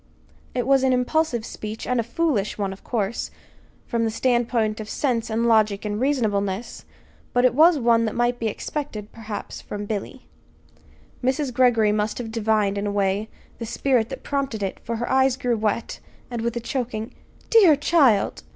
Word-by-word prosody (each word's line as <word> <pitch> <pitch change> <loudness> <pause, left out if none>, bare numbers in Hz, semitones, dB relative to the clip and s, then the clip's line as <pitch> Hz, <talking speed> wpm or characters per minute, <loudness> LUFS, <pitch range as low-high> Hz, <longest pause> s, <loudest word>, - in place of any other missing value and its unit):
It 245 -2 0
was 270 0 +4
an 260 -1 +3
impulsive 250 -1 0
speech, 215 -1 -6
and 250 -1 0
a - - +1
foolish 235 -5 -1
one, 200 -2 -2
of 190 - -15
course, 220 -2 -2 0.6
from 235 -1 -1
the 225 - +1
standpoint 230 -2 +1
of 215 -1 -6
sense 240 -6 -1
and 225 +1 0
logic 215 -3 +3
and 210 +1 -2
reasonableness; 215 -6 -1 0.5
but 245 +1 +3
it 250 - +4
was 320 +4 +6
one 230 -3 +3
that 220 - -3
might 240 0 +1
be 230 - -1
expected, 215 -2 -5
perhaps, 220 -2 -7
from 205 0 -6
Billy. 215 +5 -5 1.0
Mrs. 260 +1 0
Greggory 235 -4 +4
must 210 0 -1
have 230 -3 -5
divined, 215 -3 +1
in 205 - -2
a - - -1
way, 200 +1 0 0.3
the 230 - -4
spirit 240 -1 +1
that - - -7
prompted 270 -7 -2
it, 195 - -3
for 230 - -4
her 240 +2 -3
eyes 265 -1 +3
grew 245 -2 0
wet, 220 +1 -2 0.3
and 235 -2 -3
with 235 +1 -2
a - - -3
choking 235 -3 -3 0.4
"Dear 390 -9 +7
child!" 275 -8 +3
230 Hz, 180 wpm, -23 LUFS, 215-255 Hz, 1.0 s, Dear